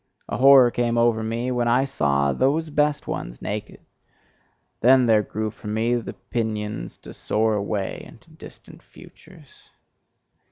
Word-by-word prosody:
A - - -4
horror 135 -2 +7
came 120 -1 -1
over 115 -1 +2
me 115 +3 -3
when 120 -1 0
I 125 +3 +3
saw 70 - 0
those 150 - 0
best 150 0 0
ones - - -5
naked: 105 0 -6 1.0
then 130 +1 +5
there 110 -2 +4
grew 110 +1 -4
for 105 - -12
me 110 +3 0
the 120 -2 -3
pinions 105 - -4
to - - -10
soar 110 +1 0
away 100 -1 -3
into - - -18
distant - - -14
futures. - - -18
115 Hz, 145 wpm, -23 LUFS, 105-125 Hz, 1.0 s, horror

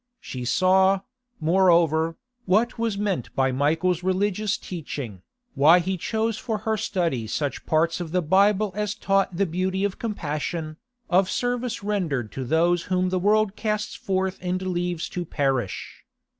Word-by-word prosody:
She 125 -1 -6
saw, 190 +6 +4 0.4
moreover, 165 -2 +3 0.3
what 225 +6 +2
was 225 -3 0
meant 200 - -1
by 135 0 +2
Michael's 160 +6 +1
religious 200 +2 0
teaching, 140 - -6 0.3
why 155 +5 +6
he 185 +2 -1
chose 220 +4 -1
for 225 -3 -2
her 220 0 +1
study 170 - -1
such 145 +5 -3
parts 165 +2 +2
of 165 -2 -5
the 180 0 +1
Bible 200 +5 +3
as 210 0 -2
taught 195 -3 +1
the 200 - +3
beauty 185 +3 -1
of 200 -2 -2
compassion, 155 -6 -3 0.3
of 185 +1 +3
service 245 -2 -2
rendered 165 - -1
to 135 - -5
those 170 +6 +2
whom 185 -1 +1
the 185 0 0
world 210 +1 +2
casts 215 -1 -2
forth 190 -1 -2
and 185 +1 -2
leaves 175 -2 -2
to 180 - -3
perish. 135 - -2
185 Hz, 150 wpm, -24 LUFS, 160-200 Hz, 0.4 s, why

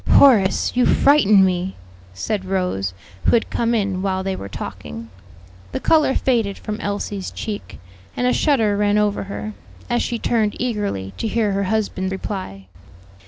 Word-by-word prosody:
"Horace, 220 -9 +5
you 250 - +3
frighten 210 -9 +5
me," 185 0 -1 0.4
said 195 - -2
Rose, 180 - -1 0.3
who - - +4
had 235 - +2
come 235 0 +1
in 195 -4 -1
while 190 -1 -1
they 190 0 -2
were 100 - -7
talking. 115 +3 -7 0.6
The - - -1
color 305 -4 +3
faded 225 -6 +1
from 210 0 -5
Elsie's 200 -1 -3
cheek, 210 -2 -6 0.4
and 250 - 0
a 250 - +3
shudder 225 -9 +2
ran 205 0 +2
over 210 -1 +1
her, 215 +2 -5 0.4
as 240 - +2
she 235 - -1
turned 220 -2 0
eagerly 205 - -2
to 225 - -2
hear 220 -1 +1
her 200 0 0
husband 195 -2 -1
reply. 185 - -5
205 Hz, 160 wpm, -21 LUFS, 190-225 Hz, 0.6 s, Horace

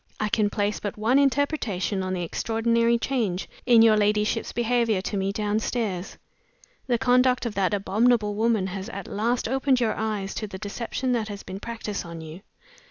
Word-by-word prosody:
I 215 - 0
can 210 -1 +2
place 205 +1 -1
but 205 0 -5
one 230 +6 +3
interpretation 260 - 0
on 185 0 -2
the 175 - -2
extraordinary 230 +5 +1
change 230 -8 -1 0.2
in 235 -2 +7
your 220 -1 +6
ladyship's 210 +2 +1
behavior 235 -3 +1
to 205 - -4
me 195 0 0
downstairs. 210 -2 -2 0.7
The 245 -2 +2
conduct 250 0 +3
of 235 - -2
that 195 -3 +1
abominable 210 +2 +2
woman 220 -2 +1
has 190 +1 -5
at 195 -2 -7
last 230 +4 -1
opened 265 +1 +2
your 230 -3 +1
eyes 210 -3 -3
to 215 - -4
the 190 -2 -7
deception 230 +5 -3
that 230 -4 0
has 205 -2 -7
been 190 +1 -7
practiced 220 -2 -5
on 170 -1 -8
you. 160 +3 -9
215 Hz, 175 wpm, -25 LUFS, 200-235 Hz, 0.7 s, in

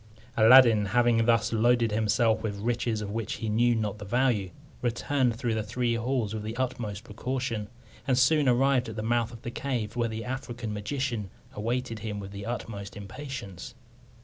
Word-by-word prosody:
Aladdin, 115 -2 +7
having 120 +1 +3
thus 115 -1 +3
loaded 115 0 +3
himself 110 +1 +2
with 105 -2 -3
riches 115 0 -1
of 100 -1 -4
which 110 -1 -3
he 110 - -4
knew 120 +3 +3
not 105 -2 -2
the - - -7
value, 110 -2 +1 0.3
returned 125 +1 +1
through 115 0 -1
the 110 - 0
three 115 +3 -1
halls 115 -2 -1
with 110 - -3
the 110 +2 -5
utmost 120 -5 -3
precaution, 120 -1 -3 0.4
and 130 -2 +3
soon 140 +2 +4
arrived 130 0 +3
at 110 - -7
the 110 - -3
mouth 120 0 +1
of 115 -2 -12
the 120 - -4
cave, 125 -7 -3
where 120 -1 0
the 110 0 -5
African 120 -4 -4
magician 115 -1 -3 0.2
awaited 115 +1 -2
him 105 -1 -4
with 100 -1 -7
the 100 +1 -7
utmost 105 -4 -5
impatience. 105 - -7
115 Hz, 175 wpm, -28 LUFS, 105-125 Hz, 0.4 s, Aladdin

